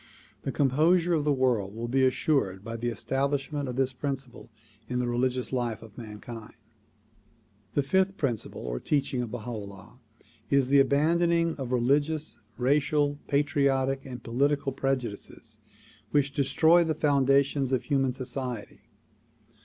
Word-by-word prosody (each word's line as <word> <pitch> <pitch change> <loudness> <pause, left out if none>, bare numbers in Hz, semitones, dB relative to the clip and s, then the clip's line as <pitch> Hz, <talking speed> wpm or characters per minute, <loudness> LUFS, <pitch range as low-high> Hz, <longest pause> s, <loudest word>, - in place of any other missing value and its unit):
The 135 - -3
composure 160 +7 +3
of 150 -3 +1
the 150 - +3
world 120 -7 +1
will 115 +1 -4
be 130 +2 +2
assured 125 -8 0
by 115 +1 -5
the 115 +1 -3
establishment 135 +4 -1
of 125 - -4
this 130 0 0
principle 135 -3 -5 0.4
in 125 - -1
the 125 0 0
religious 125 +1 -1
life 120 -4 -2
of 110 -2 -14
mankind. 110 0 -9 1.2
The 145 - +3
fifth 190 +7 +1
principle 125 -8 -2
or - - -3
teaching 140 -3 0
of 120 - -4
Baha 120 +1 -6
'Ullah 100 +1 -9 0.5
is 140 -2 +3
the 140 0 +6
abandon 155 +5 +3
ing 170 -1 +2
of 130 -3 -5
religious, 145 +5 +1 0.2
racial, 145 +2 +2
patriotic 140 -2 +1
and 125 -2 -8
political 140 +4 +1
prejudices 130 -6 -3 0.5
which 140 -1 +1
destroy 160 +6 +4
the 160 -2 -1
foundations 140 -2 +2
of 130 - +1
human 135 -3 +1
society. 125 -3 -5
135 Hz, 140 wpm, -28 LUFS, 120-145 Hz, 1.2 s, the